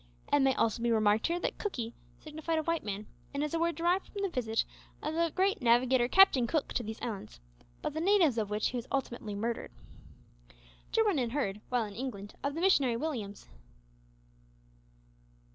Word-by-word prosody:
It 290 Hz, -, +6 dB
may 270 Hz, -2 st, +3 dB
also 230 Hz, 0 st, +1 dB
be 235 Hz, -, +1 dB
remarked 215 Hz, -1 st, +3 dB
here 340 Hz, +1 st, 0 dB
that -, -, -2 dB
"Cookee" 240 Hz, -, -3 dB, 0.2 s
signified 315 Hz, +1 st, -3 dB
a 315 Hz, -, 0 dB
white 330 Hz, 0 st, 0 dB
man, 205 Hz, 0 st, -4 dB, 0.3 s
and 280 Hz, -, 0 dB
is 300 Hz, -, -3 dB
a 330 Hz, -, +1 dB
word 335 Hz, 0 st, +1 dB
derived 350 Hz, +3 st, +1 dB
from 400 Hz, -1 st, -5 dB
the 395 Hz, -, +1 dB
visit 225 Hz, -8 st, 0 dB, 0.4 s
of 305 Hz, -, -2 dB
that 335 Hz, -1 st, 0 dB
great 390 Hz, -1 st, +2 dB
navigator 245 Hz, +1 st, +4 dB
Captain 270 Hz, -7 st, +6 dB
Cook 305 Hz, +3 st, 0 dB
to -, -, 0 dB
these 220 Hz, -1 st, -6 dB
islands, 205 Hz, -, -5 dB, 0.4 s
by -, -, 0 dB
the 315 Hz, -, -3 dB
natives 340 Hz, -, +4 dB
of 210 Hz, -2 st, -2 dB
which 210 Hz, +1 st, 0 dB
he 250 Hz, -, -4 dB
was 240 Hz, -, -5 dB
ultimately 235 Hz, -6 st, -3 dB
murdered. 230 Hz, +3 st, -2 dB, 1.2 s
Jarwin 420 Hz, -8 st, +3 dB
had 240 Hz, -2 st, -1 dB
heard, 210 Hz, -8 st, -1 dB
while 245 Hz, -3 st, +1 dB
in 205 Hz, -, -8 dB
England, 205 Hz, -4 st, -6 dB
of 280 Hz, +1 st, -1 dB
the 330 Hz, -, -3 dB
missionary 275 Hz, -11 st, +4 dB
Williams. 230 Hz, -9 st, -4 dB
260 Hz, 185 wpm, -31 LUFS, 225-330 Hz, 1.2 s, It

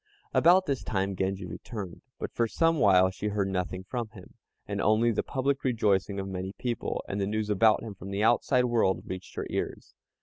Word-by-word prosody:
About 180 Hz, +3 st, +5 dB
this 140 Hz, -6 st, -2 dB
time 95 Hz, -1 st, -1 dB
Genji 95 Hz, +1 st, -2 dB
returned, 90 Hz, +2 st, -7 dB, 0.2 s
but -, -, -5 dB
for 115 Hz, -, +1 dB
some 165 Hz, +6 st, +2 dB
while 95 Hz, -4 st, +5 dB
she 95 Hz, +2 st, -4 dB
heard 100 Hz, -2 st, 0 dB
nothing 90 Hz, 0 st, -3 dB
from 120 Hz, +4 st, -4 dB
him, 100 Hz, -4 st, -14 dB, 0.3 s
and -, -, -3 dB
only 110 Hz, +2 st, +3 dB
the -, -, 0 dB
public 135 Hz, 0 st, -1 dB
rejoicing 100 Hz, -5 st, +1 dB
of 95 Hz, -, -4 dB
many 95 Hz, 0 st, -4 dB
people, 120 Hz, +1 st, -3 dB
and 100 Hz, +1 st, -2 dB
the 95 Hz, -, 0 dB
news 105 Hz, 0 st, -1 dB
about 105 Hz, +2 st, +4 dB
him 110 Hz, -3 st, -6 dB
from 95 Hz, 0 st, -9 dB
the 100 Hz, +2 st, -1 dB
outside 120 Hz, +2 st, +3 dB
world 115 Hz, -6 st, +1 dB
reached 95 Hz, -1 st, -7 dB
her -, -, -3 dB
ears. -, -, -4 dB
105 Hz, 200 wpm, -28 LUFS, 95-120 Hz, 0.3 s, About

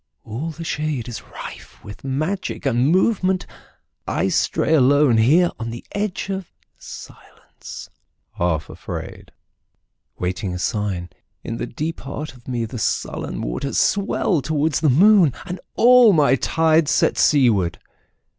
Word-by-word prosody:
All 125 Hz, +10 st, -5 dB
the 165 Hz, +1 st, -7 dB
shadeIs 145 Hz, -7 st, -3 dB
rife -, -, -10 dB
with 100 Hz, 0 st, -11 dB
magic 155 Hz, +8 st, -3 dB
and 125 Hz, -1 st, +2 dB
movement. 185 Hz, +1 st, +2 dB, 0.6 s
I -, -, 0 dB
stray -, -, 0 dB
aloneHere 145 Hz, +3 st, +4 dB
on 115 Hz, 0 st, -4 dB
the 120 Hz, +1 st, -8 dB
edge 205 Hz, -2 st, -3 dB
of 190 Hz, -3 st, -5 dB, 0.3 s
silence, -, -, -11 dB, 0.4 s
half 80 Hz, -3 st, -1 dB
afraid, -, -, -8 dB, 0.9 s
Waiting 90 Hz, +1 st, -3 dB
a -, -, -4 dB
sign. 90 Hz, -2 st, -2 dB, 0.3 s
In 115 Hz, -, -5 dB
the 120 Hz, -, -4 dB
deep 155 Hz, +8 st, -4 dB
heart 145 Hz, +2 st, -6 dB
of 125 Hz, -2 st, -19 dB
meThe 120 Hz, -2 st, -4 dB
sullen -, -, -2 dB
waters 100 Hz, -, -3 dB
swell 195 Hz, -4 st, +1 dB
towards 150 Hz, +2 st, 0 dB
the 155 Hz, -, +2 dB
moon, 180 Hz, -, +5 dB
And 180 Hz, -1 st, -6 dB, 0.2 s
all 245 Hz, -3 st, +7 dB
my 145 Hz, -6 st, +4 dB
tides 160 Hz, +1 st, +2 dB
set -, -, +2 dB
seaward. 115 Hz, -, +3 dB
145 Hz, 125 wpm, -21 LUFS, 115-165 Hz, 0.9 s, all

